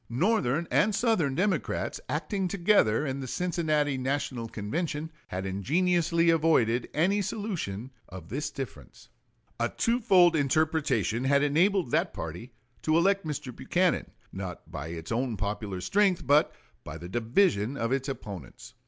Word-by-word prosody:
Northern 165 Hz, -, +1 dB
and 210 Hz, -1 st, +3 dB
Southern 190 Hz, -, +1 dB
Democrats, 190 Hz, +4 st, -1 dB
acting 195 Hz, -3 st, -1 dB
together 175 Hz, -, +3 dB
in 135 Hz, -1 st, -3 dB
the 130 Hz, -, -5 dB
Cincinnati 155 Hz, -4 st, 0 dB
National 130 Hz, -3 st, -2 dB
Convention, 150 Hz, -, -3 dB, 0.2 s
had 95 Hz, +1 st, -4 dB
ingeniously 165 Hz, -, +2 dB
avoided 130 Hz, -8 st, +2 dB
any 190 Hz, +7 st, +2 dB
solution 170 Hz, -, -4 dB, 0.2 s
of 90 Hz, -3 st, -10 dB
this 145 Hz, +4 st, -3 dB
difference. 135 Hz, -6 st, -9 dB, 0.5 s
A -, -, +1 dB
twofold 200 Hz, -8 st, +3 dB
interpretation 145 Hz, -, +1 dB
had 140 Hz, +1 st, +3 dB
enabled 170 Hz, +1 st, +2 dB
that -, -, +1 dB
party 85 Hz, +11 st, -6 dB, 0.3 s
to 155 Hz, +1 st, +2 dB
elect 195 Hz, 0 st, +2 dB
Mr. 130 Hz, -5 st, -5 dB
Buchanan, 175 Hz, +7 st, 0 dB, 0.2 s
not 95 Hz, -4 st, -7 dB
by 70 Hz, +3 st, -5 dB
its 80 Hz, +2 st, -7 dB
own 120 Hz, -1 st, -1 dB
popular 100 Hz, -1 st, -3 dB
strength, 195 Hz, -, +2 dB
but 145 Hz, +2 st, +4 dB, 0.3 s
by 80 Hz, +1 st, -7 dB
the 85 Hz, +2 st, -8 dB
division 120 Hz, -, +1 dB
of 115 Hz, +1 st, -1 dB
its 135 Hz, +1 st, 0 dB
opponents. 100 Hz, -, -8 dB
145 Hz, 135 wpm, -28 LUFS, 115-175 Hz, 0.5 s, but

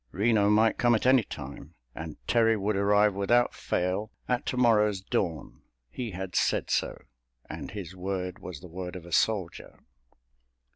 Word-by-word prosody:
Reno 105 Hz, 0 st, +2 dB
might 110 Hz, +1 st, +3 dB
come 120 Hz, -1 st, +4 dB
at 110 Hz, -, -1 dB
any 130 Hz, 0 st, +6 dB
time, 70 Hz, 0 st, -9 dB, 0.2 s
and -, -, -7 dB
Terry 115 Hz, -1 st, +3 dB
would 105 Hz, +1 st, -1 dB
arrive 105 Hz, +1 st, +3 dB
without 120 Hz, +5 st, +2 dB
fail 95 Hz, +5 st, -2 dB, 0.2 s
at 125 Hz, +2 st, -1 dB
tomorrow's 110 Hz, -6 st, +3 dB
dawn—he 80 Hz, -, -5 dB
had 95 Hz, -1 st, -6 dB
said -, -, +1 dB
so, -, -, -1 dB, 0.4 s
and -, -, -7 dB
his 95 Hz, -3 st, -7 dB
word 90 Hz, 0 st, -4 dB
was 85 Hz, -6 st, -8 dB
the -, -, -10 dB
word 90 Hz, +1 st, -7 dB
of 90 Hz, -2 st, -8 dB
a 85 Hz, -, -12 dB
soldier. 95 Hz, -6 st, 0 dB
100 Hz, 150 wpm, -28 LUFS, 90-110 Hz, 0.4 s, any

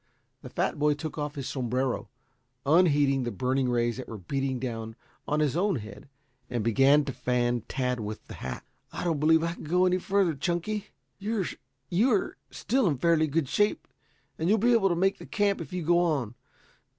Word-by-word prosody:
The -, -, -9 dB
fat -, -, -1 dB
boy 150 Hz, 0 st, +3 dB
took 155 Hz, +1 st, -6 dB
off 145 Hz, +1 st, -3 dB
his 135 Hz, -3 st, -4 dB
sombrero, 130 Hz, -3 st, -2 dB, 0.6 s
unheeding 145 Hz, -4 st, +4 dB
the 120 Hz, -, -2 dB
burning 130 Hz, +1 st, 0 dB
rays 120 Hz, -1 st, +1 dB
that 130 Hz, -, -6 dB
were 110 Hz, -, -7 dB
beating 135 Hz, +7 st, -2 dB
down 115 Hz, -3 st, -5 dB, 0.3 s
on 150 Hz, +1 st, +1 dB
his 150 Hz, -2 st, +1 dB
own 190 Hz, +2 st, +2 dB
head, 110 Hz, +2 st, -8 dB, 0.4 s
and 120 Hz, -3 st, -2 dB
began 135 Hz, +6 st, +4 dB
to 135 Hz, -, -4 dB
fan 120 Hz, -1 st, 0 dB
Tad 125 Hz, -2 st, -1 dB
with 110 Hz, 0 st, -6 dB
the -, -, -10 dB
hat. 65 Hz, -1 st, -6 dB, 0.3 s
"I -, -, -5 dB
don't 165 Hz, -4 st, 0 dB
believe 160 Hz, +2 st, +4 dB
I 170 Hz, 0 st, -1 dB
can -, -, -10 dB
go 180 Hz, +4 st, +3 dB
any 185 Hz, 0 st, +2 dB
further, 195 Hz, -2 st, +1 dB
Chunky. 175 Hz, +8 st, -2 dB, 0.3 s
You 205 Hz, -1 st, -1 dB, 0.7 s
are 205 Hz, -, 0 dB
still 255 Hz, -2 st, 0 dB
in 145 Hz, -5 st, +1 dB
fairly 160 Hz, +2 st, +3 dB
good 150 Hz, -1 st, 0 dB
shape 205 Hz, +9 st, +1 dB, 0.5 s
and 165 Hz, +3 st, 0 dB
you'll 215 Hz, -, +5 dB
be 240 Hz, +3 st, +3 dB
able 205 Hz, -4 st, +4 dB
to 175 Hz, -, +1 dB
make 195 Hz, +3 st, +1 dB
the -, -, -10 dB
camp 205 Hz, -3 st, +1 dB
if 155 Hz, -, -8 dB
you 180 Hz, -1 st, -3 dB
go 170 Hz, +2 st, +4 dB
on. 145 Hz, -10 st, 0 dB
150 Hz, 195 wpm, -28 LUFS, 125-175 Hz, 0.7 s, you'll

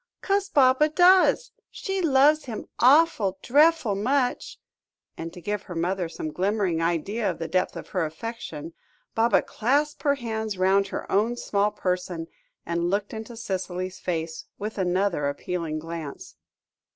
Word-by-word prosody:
"'Cos 395 Hz, 0 st, +1 dB
Baba 270 Hz, +1 st, +4 dB
does. 365 Hz, +8 st, +5 dB, 0.2 s
She 385 Hz, -1 st, -3 dB
loves 300 Hz, 0 st, +4 dB
him 225 Hz, -5 st, -6 dB
awful, 250 Hz, -, +4 dB
drefful 295 Hz, -4 st, +4 dB
much," 250 Hz, +5 st, 0 dB, 0.6 s
and 165 Hz, 0 st, -6 dB
to 180 Hz, -, -11 dB
give 205 Hz, +3 st, -3 dB
her 180 Hz, -4 st, -9 dB
mother 175 Hz, +1 st, -1 dB
some 155 Hz, -1 st, -5 dB
glimmering 190 Hz, -3 st, 0 dB
idea 190 Hz, +6 st, 0 dB
of 170 Hz, -, -3 dB
the 165 Hz, -, -4 dB
depth 185 Hz, +3 st, 0 dB
of -, -, -8 dB
her 180 Hz, -3 st, -1 dB
affection, 165 Hz, -2 st, -6 dB, 0.4 s
Baba 230 Hz, +1 st, +3 dB
clasped 285 Hz, +6 st, 0 dB
her 285 Hz, -2 st, +2 dB
hands 220 Hz, -5 st, -4 dB
round 195 Hz, +2 st, +3 dB
her -, -, -6 dB
own 225 Hz, +5 st, +2 dB
small 205 Hz, -2 st, +1 dB
person, 180 Hz, -4 st, -3 dB, 0.4 s
and 170 Hz, 0 st, -1 dB
looked 200 Hz, +2 st, -1 dB
into 225 Hz, +1 st, -7 dB
Cicely's 185 Hz, -4 st, -4 dB
face, 165 Hz, -2 st, -3 dB
with 210 Hz, 0 st, -5 dB
another 180 Hz, -4 st, +1 dB
appealing 165 Hz, +1 st, -3 dB
glance. 160 Hz, -2 st, -7 dB
200 Hz, 145 wpm, -25 LUFS, 175-250 Hz, 0.6 s, does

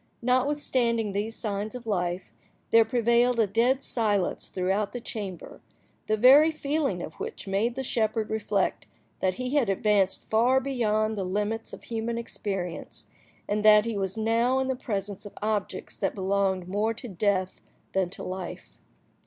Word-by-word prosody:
Notwithstanding 250 Hz, -4 st, +1 dB
these 210 Hz, +3 st, -2 dB
signs 210 Hz, +1 st, -3 dB
of 245 Hz, -1 st, -8 dB
life, 180 Hz, -3 st, -2 dB, 0.4 s
there 230 Hz, 0 st, +7 dB
prevailed 235 Hz, +1 st, +2 dB
a 225 Hz, -, +5 dB
dead 235 Hz, +7 st, +2 dB
silence 205 Hz, -6 st, 0 dB
throughout 195 Hz, +3 st, -1 dB
the 245 Hz, -, -3 dB
chamber, 200 Hz, -7 st, -6 dB, 0.5 s
the 215 Hz, -, +2 dB
very 270 Hz, +7 st, +7 dB
feeling 290 Hz, -, -1 dB
of 155 Hz, -, -7 dB
which -, -, -6 dB
made 210 Hz, +5 st, 0 dB
the 265 Hz, -, -3 dB
shepherd 220 Hz, -3 st, 0 dB
reflect 210 Hz, -3 st, -1 dB, 0.3 s
that 185 Hz, -1 st, +1 dB
he 255 Hz, 0 st, -3 dB
had 275 Hz, -8 st, +2 dB
advanced 195 Hz, -1 st, +1 dB
far 240 Hz, +4 st, +4 dB
beyond 220 Hz, -5 st, 0 dB
the -, -, -1 dB
limits 210 Hz, +4 st, -2 dB
of -, -, -10 dB
human 230 Hz, 0 st, -3 dB
experience, 195 Hz, -6 st, -5 dB, 0.4 s
and 210 Hz, +1 st, 0 dB
that 210 Hz, 0 st, +7 dB
he 230 Hz, -2 st, -2 dB
was 195 Hz, 0 st, -2 dB
now 230 Hz, +4 st, +2 dB
in 265 Hz, 0 st, 0 dB
the 260 Hz, -, +1 dB
presence 205 Hz, -5 st, -4 dB
of -, -, -13 dB
objects 210 Hz, -1 st, -3 dB
that 195 Hz, -, -1 dB
belonged 190 Hz, -2 st, 0 dB
more 210 Hz, +4 st, 0 dB
to 245 Hz, -, -7 dB
death 190 Hz, -1 st, -1 dB, 0.3 s
than 190 Hz, -2 st, +1 dB
to -, -, -7 dB
life. 185 Hz, -1 st, -7 dB
215 Hz, 160 wpm, -27 LUFS, 195-235 Hz, 0.5 s, there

